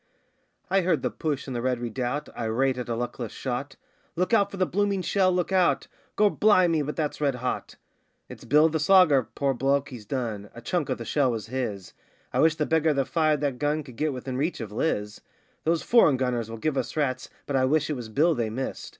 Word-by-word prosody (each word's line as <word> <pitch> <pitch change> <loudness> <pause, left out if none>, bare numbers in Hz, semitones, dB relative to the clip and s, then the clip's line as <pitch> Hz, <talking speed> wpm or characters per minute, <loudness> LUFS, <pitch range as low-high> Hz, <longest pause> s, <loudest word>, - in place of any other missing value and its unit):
I 195 0 +2
heard 170 -3 +1
the - - 0
push 145 -4 -3
in 130 - -4
the 120 - -2
Red 125 -1 0
Redoubt, 125 +5 -3
irate 125 +3 0
at 125 - -5
a 115 - -1
luckless 120 -1 -4
shot: 130 +2 -4 0.4
'Look 180 +6 0
out 200 -3 +4
for 195 - -8
the 185 - +2
blooming 200 0 0
shell, 190 -1 +2
look 180 0 -1
out!' 185 -2 +2 0.3
'Gor' 210 -1 +4
bli' 205 -4 +4
me, 165 -2 +1
but 150 +1 -4
that's 150 -2 -3
red 140 -3 +1
hot!' 125 0 -4 0.5
'It's - - -11
Bill 150 +3 +5
the 160 0 -1
Slogger 150 - +5
poor 140 -1 +1
bloke 135 +2 0
he's 115 -6 -10
done. 110 -6 -3
A 115 - -9
chunk 170 +2 -1
of - - -1
the 115 - -7
shell 140 0 +2
was 115 -3 -3
his; 105 -8 -4 0.4
I 125 - +1
wish 160 +2 +4
the 150 - 0
beggar 160 -1 +2
that 135 -1 +1
fired 155 -2 +2
that 140 -4 -1
gun 150 +1 0
could 125 -4 -13
get 155 +4 0
within 130 0 -5
reach 155 +5 -1
of 110 -4 -6
Liz.' 105 -4 -2 0.4
'Those 165 0 +1
foreign 195 - +5
gunners 125 -3 -1
will 115 - -6
give 145 +4 -1
us 130 - -5
rats, 130 -4 -1 0.2
but 140 - -3
I 130 -1 +3
wish 150 +3 +1
it - - -1
was 120 -4 -7
Bill 155 +9 +3
they 120 -6 -1
missed. 130 +5 -5
140 Hz, 225 wpm, -26 LUFS, 125-160 Hz, 0.5 s, Bill